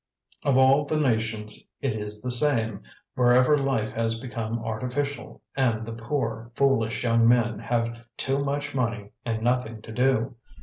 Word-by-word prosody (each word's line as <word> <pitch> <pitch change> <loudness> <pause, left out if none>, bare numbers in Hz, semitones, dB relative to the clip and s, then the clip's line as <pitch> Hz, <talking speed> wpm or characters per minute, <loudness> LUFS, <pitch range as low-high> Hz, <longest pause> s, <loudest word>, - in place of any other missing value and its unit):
Of 135 -2 +3
all 135 +2 +5
the 155 +1 0
nations 110 -5 -1 0.2
it 135 -5 -1
is 105 -1 -5
the 125 - -2
same, 115 -6 +2 0.3
wherever 125 +3 +5
life 135 -6 0
has 115 0 -1
become 115 -2 -4
artificial 125 +6 -4
and 115 -5 +1
the 115 - -6
poor, 115 -1 -3
foolish 120 -6 +2
young 115 -1 +4
men 115 -3 +3
have 115 0 -2
too 135 +1 0
much 145 +1 -2
money 115 -6 -2
and 115 -2 -2
nothing 120 -2 0
to 110 - -9
do. 125 0 +1
115 Hz, 155 wpm, -26 LUFS, 115-135 Hz, 0.3 s, all